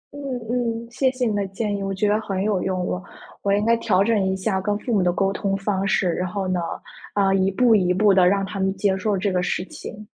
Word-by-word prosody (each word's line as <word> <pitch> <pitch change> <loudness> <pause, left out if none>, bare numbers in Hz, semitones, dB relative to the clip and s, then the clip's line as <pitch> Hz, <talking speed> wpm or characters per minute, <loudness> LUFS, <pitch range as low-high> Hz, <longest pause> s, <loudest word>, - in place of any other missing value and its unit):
嗯 - - -7 0.3
嗯， 235 -1 -2
谢 260 +1 +2
谢 255 -1 -2
你 215 -3 0
的 200 - 0
建 205 +2 -3
议， 200 - -4
我 195 0 -2
觉 195 +2 0
得 210 +1 +2
很 195 -2 -2
有 205 -3 0
用， 185 -1 -1
我 180 - -3 0.4
我 200 - 0
应 205 +1 +2
该 230 +1 +4
调 195 -4 +2
整 215 -2 +2
一 190 - -1
下 190 0 -1
跟 205 +1 0
父 235 +3 -3
母 205 - +3
的 180 -1 +2
沟 195 +2 0
通 195 0 -1
方 195 -1 -1
式， 190 - +2
然 180 - -2
后 190 +1 -3
呢， 185 -1 0 0.5
啊， 195 -1 +2
一 190 0 +2
步 230 +3 +4
一 180 -3 +2
步 200 +2 +4
地 185 -2 +5
让 195 +1 +2
他 195 0 -6
们 190 0 +1
接 190 0 +1
受 200 +1 0
这 195 +2 0
个 180 - +1
事 180 0 -1
情。 210 +2 -9
195 Hz, 285 characters per minute, -23 LUFS, 190-215 Hz, 0.5 s, 地